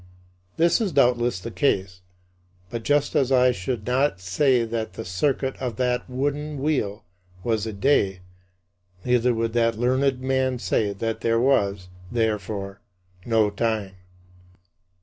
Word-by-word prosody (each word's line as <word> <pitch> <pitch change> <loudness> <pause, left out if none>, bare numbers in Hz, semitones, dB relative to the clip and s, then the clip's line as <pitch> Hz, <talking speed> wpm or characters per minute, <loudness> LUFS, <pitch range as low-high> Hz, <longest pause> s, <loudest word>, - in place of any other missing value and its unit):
" 90 +1 -38
This 170 +7 +3
is 205 -5 0
doubtless 120 - +2
the 115 +5 -7
case, 95 -9 0 0.7
but 115 - -3
just 145 +4 +1
as 135 -1 +2
I 125 -1 +5
should 110 +1 -4
not 130 -3 +1
say 120 +7 +2
that 115 -1 -4
the - - -7
circuit 130 +8 -1
of 125 -4 -4
that 125 +2 -1
wooden 145 +3 -2
wheel 130 -9 -1 0.4
was 110 -2 0
a - - -3
day, 100 -5 +1 0.8
neither 125 0 +3
would 115 0 -1
that 115 -2 +2
learned 130 +2 +1
man 130 -1 0
say 110 -3 0
that 110 +3 -3
there 115 0 +2
was, 100 -7 +1 0.2
therefore, 105 -3 -2 0.5
no 110 -3 +3
time. 105 -2 -1
115 Hz, 140 wpm, -24 LUFS, 105-130 Hz, 0.8 s, I